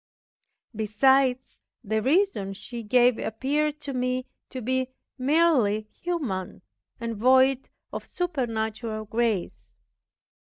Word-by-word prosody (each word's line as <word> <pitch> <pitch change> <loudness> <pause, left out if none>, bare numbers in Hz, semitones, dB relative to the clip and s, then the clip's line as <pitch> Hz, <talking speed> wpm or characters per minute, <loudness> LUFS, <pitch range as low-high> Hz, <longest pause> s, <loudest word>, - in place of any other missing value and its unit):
Besides, 255 +4 +2 0.2
the 220 0 0
reason 275 - +1
she 235 +3 -7
gave 245 +2 +3
appeared 290 +6 -1
to 280 -2 -5
me 255 0 -1 0.2
to 260 - -6
be 260 +2 0 0.3
merely 265 -7 +3
human, 270 - -4 0.4
and 230 -1 -3
void 260 +3 +4 0.2
of - - -6
supernatural 225 -9 -2
grace. 220 -4 -1
250 Hz, 95 wpm, -26 LUFS, 220-270 Hz, 0.4 s, void